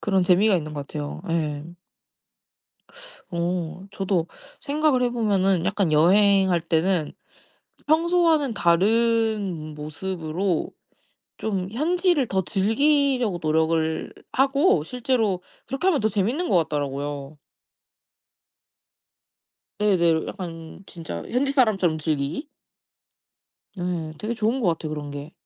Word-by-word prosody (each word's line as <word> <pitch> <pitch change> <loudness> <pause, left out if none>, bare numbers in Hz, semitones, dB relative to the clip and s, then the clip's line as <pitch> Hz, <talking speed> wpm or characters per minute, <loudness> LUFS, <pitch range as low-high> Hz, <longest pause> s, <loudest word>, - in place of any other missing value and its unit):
그런 195 -3 +1
재미가 190 +3 +4
있는 155 -2 -5
것 145 -1 -5
같아요. 145 -1 -6
예. 150 -3 -1 1.7
오. 175 +1 -3
저도 190 -4 -1 0.3
생각을 295 -3 +1
해 245 - +2
보면은 195 -6 +1
약간 190 -3 0
여행할 190 +2 +4
때는 165 0 0 0.7
평소와는 320 -4 +3
다른 205 -3 +1
모습으로 165 +3 -3 0.7
좀 190 -4 -2
현지를 335 - +1
더 190 -3 0
즐기려고 245 - +1
노력을 160 0 0 0.2
하고 275 - +3
실제로 225 -5 -1 0.2
그렇게 270 +9 -3
하면 325 -7 +2
더 220 - +2
재미있는 225 - -1
것 185 - +3
같더라고요. 145 0 -4 2.4
네네. 170 -6 +2
약간 165 -2 -8
진짜 160 - -7
현지 275 +3 +1
사람처럼 195 - +2
즐기기? 155 - -2 1.3
네. 175 -3 -3
되게 225 +3 -3
좋은 230 +4 0
것 195 - +2
같아요 165 -2 -2
그런 150 -1 -5
게. 145 +3 -8
190 Hz, 235 characters per minute, -24 LUFS, 160-230 Hz, 2.4 s, 재미가